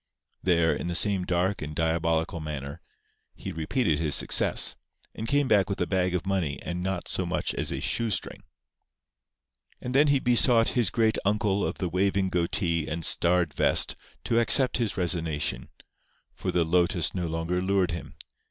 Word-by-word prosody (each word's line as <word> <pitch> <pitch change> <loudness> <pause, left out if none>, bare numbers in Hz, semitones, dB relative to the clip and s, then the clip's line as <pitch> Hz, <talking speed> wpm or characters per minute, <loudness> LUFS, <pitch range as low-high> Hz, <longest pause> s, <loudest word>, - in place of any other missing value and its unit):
There, 85 -3 +2
in - - -5
the 85 - -3
same 95 0 +1
dark 90 +3 -1
and 75 0 -6
diabolical 80 +1 -1
manner, 70 -3 -6 0.5
he - - -7
repeated 80 - -1
his 75 -3 +4
success; - - +4 0.4
and 110 - -6
came 140 +2 +1
back 105 -4 +2
with 100 - -3
a 90 - +1
bag 90 0 -1
of 90 - -3
money 90 -7 -1
and 90 0 -4
not 95 -1 -3
so - - -1
much - - -2
as - - -3
a - - -3
shoestring. 115 -4 -2 1.4
And 125 - -6
then 145 +3 +4
he 140 -1 +3
besought 120 -2 +4
his 120 -6 0
great 110 -1 +1
Uncle 100 -1 0
of - - -2
the 90 - -2
waving 95 +2 0
goatee 85 -2 -1
and 80 +1 -3
starred 85 -3 +2
vest - - +1 0.3
to 115 - +1
accept 125 +2 +3
his 115 -4 -2
resignation, 85 -5 -1 0.6
for - - -5
the 85 -2 +1
lotus 85 0 +1
no 90 -2 -3
longer 80 +2 -2
lured 95 -1 +1
him. 85 - -7
90 Hz, 170 wpm, -26 LUFS, 85-100 Hz, 1.4 s, his